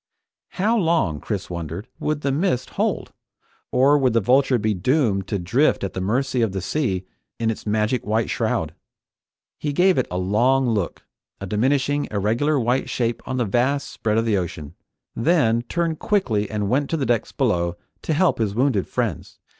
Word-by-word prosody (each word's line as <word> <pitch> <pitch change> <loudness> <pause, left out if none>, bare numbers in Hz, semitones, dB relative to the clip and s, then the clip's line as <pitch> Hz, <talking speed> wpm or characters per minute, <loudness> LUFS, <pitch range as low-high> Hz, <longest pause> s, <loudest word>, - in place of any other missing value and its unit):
How 210 +5 +1
long, 165 - +1
Chris 100 0 -4
wondered, 85 +4 -6
would 150 -1 -1
the 140 - 0
mist 140 -4 0
hold? - - -2 0.6
Or 140 +3 +4
would 130 -4 +2
the 115 - +4
Vulture 130 +4 +3
be 110 -1 0
doomed 100 - +1
to 100 - -1
drift 120 - +1
at 100 - -3
the 95 - -3
mercy 125 +6 0
of 110 -4 +1
the 95 - -2
sea 95 - -1 0.3
in 115 -1 0
its 110 - -8
magic 110 +3 +1
white 110 +2 0
shroud? - - -1 0.9
He 150 - -2
gave 180 +2 +3
it 130 - 0
a 90 - -3
long 120 +8 +2
look, 105 -7 -2 0.3
a 100 - -5
diminishing 135 +7 +1
irregular 115 +9 +1
white 125 +2 0
shape 120 -1 -1
on 130 - -2
the 120 - +1
vast 130 +7 0
spread 110 -1 -1
of 115 - +2
the 110 -3 +2
ocean, 80 -4 -5 0.4
then 115 -4 +2
turned 170 -3 -1
quickly 115 - 0
and 105 -2 -2
went 135 +6 +1
to 165 - 0
the 140 - -1
decks 115 -2 0
below 90 -10 0 0.2
to 160 - -1
help 175 -1 +2
his 105 -3 0
wounded 125 -5 +1
friends. - - -3
120 Hz, 180 wpm, -22 LUFS, 105-140 Hz, 0.9 s, Or